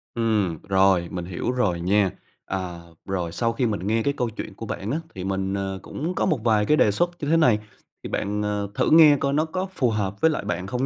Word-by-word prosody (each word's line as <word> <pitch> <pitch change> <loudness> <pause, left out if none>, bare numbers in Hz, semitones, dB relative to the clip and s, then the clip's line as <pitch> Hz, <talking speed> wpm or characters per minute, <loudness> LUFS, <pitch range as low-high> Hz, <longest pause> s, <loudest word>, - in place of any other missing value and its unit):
Ừm, 105 -8 0
rồi 95 -3 +3
mình 90 -2 -4
hiểu 90 +7 -3
rồi 105 -9 0
nha. 95 +1 +2 0.3
À, 90 -2 -4 0.3
rồi 90 -4 -2
sau 115 +5 0
khi 125 +3 0
mình 105 -4 -2
nghe 110 +1 +1
cái 140 - +1
câu 120 -2 0
chuyện 110 -2 -7
của 115 - -7
bạn 105 +1 -4
á, 155 - 0 0.2
thì 90 - -5
mình, 95 0 -2
ờ, 95 -1 -3
cũng 165 +5 -4
có - - +1
một 155 - +1
vài 110 -3 +3
cái 150 - +3
đề 105 - +4
xuất 175 - +1
như 145 - -3
thế 165 +2 +4
này. 125 -9 +4 0.4
Thì - - -5
bạn, 105 +1 -2
ờ, 105 -1 -1
thử - - +1
nghe 155 -3 +8
coi 140 0 0
nó 155 +2 +2
có 185 +4 -3
phù 125 -8 +1
hợp 100 -2 -2
với 160 - +5
lại 150 - -3
bạn 95 -2 -3
không 125 +5 -1
105 Hz, 250 wpm, -24 LUFS, 95-125 Hz, 0.4 s, nghe